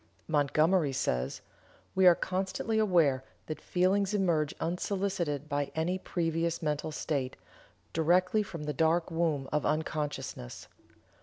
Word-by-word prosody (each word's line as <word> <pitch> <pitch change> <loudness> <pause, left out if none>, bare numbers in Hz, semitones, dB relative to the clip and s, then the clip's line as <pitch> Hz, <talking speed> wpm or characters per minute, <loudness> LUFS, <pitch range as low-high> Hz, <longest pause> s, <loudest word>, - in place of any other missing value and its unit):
Montgomery 155 +1 +2
says: 65 - -1 0.5
"We 190 -1 +5
are 175 - +8
constantly 190 +5 -1
aware 165 -11 +3 0.2
that 155 - -6
feelings 195 +3 +1
emerge 165 -6 +2
unsolicited 180 -4 -1
by 145 -1 -1
any 175 +4 0
previous 165 -2 -1
mental 150 0 -2
state, 140 -4 -2 0.6
directly 180 +6 +3
from 170 -6 -6
the 150 0 -2
dark 165 +4 +2
womb 160 -5 0
of 150 -1 +1
unconsciousness. 150 - -3
165 Hz, 120 wpm, -30 LUFS, 150-185 Hz, 0.6 s, are